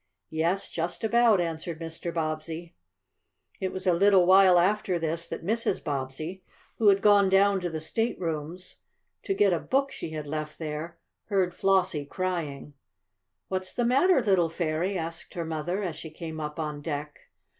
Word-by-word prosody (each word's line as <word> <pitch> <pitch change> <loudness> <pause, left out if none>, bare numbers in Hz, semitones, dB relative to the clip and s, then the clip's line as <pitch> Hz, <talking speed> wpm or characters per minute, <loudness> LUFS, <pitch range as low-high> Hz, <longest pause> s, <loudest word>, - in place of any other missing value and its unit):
"Yes, 170 +5 0
just 170 +5 -4
about," 230 -2 +4
answered 165 -1 -3
Mr. 165 +1 -5
Bobbsey. 160 +1 -4 0.9
It 190 -1 -2
was 185 0 -6
a 180 - +4
little 190 +1 +5
while 185 0 +7
after 185 0 +2
this 165 +1 -1
that - - -6
Mrs. 225 -1 0
Bobbsey, 150 +5 -4 0.4
who 220 - +3
had 195 -1 +5
gone 205 -2 +6
down 195 +1 +4
to 180 -1 -3
the 160 -1 -4
staterooms, 170 -2 -3 0.4
to 390 - -2
get 200 - +4
a 170 - +1
book 275 - 0
she - - -6
had 155 -1 -5
left 155 +1 -5
there, 160 +1 -5 0.3
heard 190 -4 +1
Flossie 185 -6 +1
crying. 155 -5 -4 0.7
"What's 185 0 -3
the 240 - 0
matter, 270 +4 +4
little 190 -6 +3
fairy?" 170 +3 -1
asked 165 0 -6
her 170 -1 -3
mother, 165 +5 -2
as 170 -5 -3
she 160 - -7
came 160 0 -7
up 150 +1 -5
on 150 -2 -3
deck. 150 -1 -6
170 Hz, 165 wpm, -27 LUFS, 160-195 Hz, 0.9 s, while